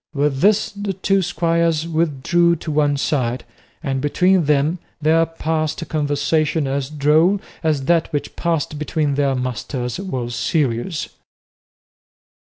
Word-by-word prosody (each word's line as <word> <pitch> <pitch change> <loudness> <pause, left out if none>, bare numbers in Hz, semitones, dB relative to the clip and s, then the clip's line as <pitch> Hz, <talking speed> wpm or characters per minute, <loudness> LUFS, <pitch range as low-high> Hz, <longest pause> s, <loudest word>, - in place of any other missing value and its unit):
With 140 -1 +1
this 205 +4 +3
the 205 -1 -4
two 195 +1 +1
squires 165 -2 +1
withdrew 170 +1 +2
to 160 0 -6
one 145 -1 +2
side, 130 -4 -1 0.4
and 135 -1 -1
between 180 +4 +2
them 150 +4 +2 0.2
there 160 +2 +3
passed 160 -1 -2
a - - -6
conversation 150 0 0
as 135 0 -2
droll 155 +6 +3 0.2
as 155 -5 0
that 165 +1 +2
which 145 -2 -3
passed 160 -3 -1
between 150 -1 -1
their 140 -1 +1
masters 125 +1 -3
was 130 -11 -4
serious. 130 +3 -1
155 Hz, 130 wpm, -20 LUFS, 140-170 Hz, 0.4 s, this